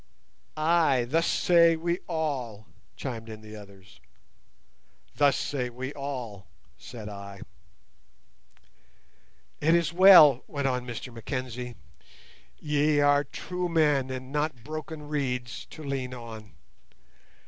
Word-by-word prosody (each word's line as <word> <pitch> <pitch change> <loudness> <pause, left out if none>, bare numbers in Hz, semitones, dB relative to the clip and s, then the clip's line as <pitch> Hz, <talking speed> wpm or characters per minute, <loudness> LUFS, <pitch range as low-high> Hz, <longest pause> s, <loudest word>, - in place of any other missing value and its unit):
"Ay, 155 -5 +3
thus 165 +6 +1
say 170 -1 +4
we 170 +2 -2
all," 135 -10 -3 0.3
chimed 115 -4 -6
in 110 -1 -9
the 110 0 -11
others. 100 -2 -14 1.2
"Thus 145 -2 +3
say 130 -4 -2
we 130 +3 -6
all," 125 -9 -6 0.3
said 115 -4 -10
I. 100 -1 -9 2.2
"It 165 +3 +3
is 170 -2 +1
well," 170 -8 +8
went 140 -2 -2
on 125 -1 -2
Mr 120 +1 -7
Mackenzie. 125 0 -5 0.8
"Ye 150 0 +1
are 145 0 +4
true 180 +5 -5
men 150 -5 +2
and 130 0 -6
not 150 -5 -2
broken 155 +1 -7
reeds 125 -5 -3
to 155 - -10
lean 135 -3 -4
on. 110 -4 -10
135 Hz, 115 wpm, -27 LUFS, 120-155 Hz, 2.2 s, well